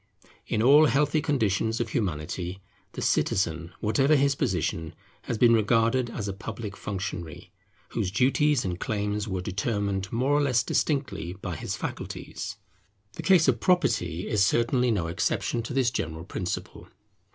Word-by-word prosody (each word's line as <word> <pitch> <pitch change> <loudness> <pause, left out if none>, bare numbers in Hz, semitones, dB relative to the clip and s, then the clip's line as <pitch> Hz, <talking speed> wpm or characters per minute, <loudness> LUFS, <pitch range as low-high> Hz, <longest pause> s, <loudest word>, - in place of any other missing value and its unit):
In 110 - 0
all 145 +5 +7
healthy 145 +2 +2
conditions 110 -5 0
of 120 -2 -1
Humanity, 90 - -3 0.3
the - - -4
citizen, 85 -2 0
whatever 135 +8 +3
his 140 0 +3
position, 90 - -2 0.3
has 120 - -2
been 120 +1 +6
regarded 115 +3 +2
as 105 -3 -4
a 100 - -2
public 105 0 -6
functionary, 95 -6 -6 0.4
whose 95 - -1
duties 135 +5 +2
and 90 -1 -3
claims 105 0 -2
were 95 -3 -2
determined 100 0 -2
more 125 +4 0
or 145 - +4
less 130 -4 +2
distinctly 135 - -1
by 95 -4 -4
his - - -4
faculties. - - -6 0.6
The - - -6
case 180 -5 +5
of 120 -4 +3
property 90 - +1
is 105 -2 +2
certainly 120 +4 +2
no 100 -7 +1
exception 85 +7 -1
to 115 - -7
this 130 -3 +2
general 80 -2 -4
principle. 90 0 -5
110 Hz, 150 wpm, -27 LUFS, 95-130 Hz, 0.6 s, all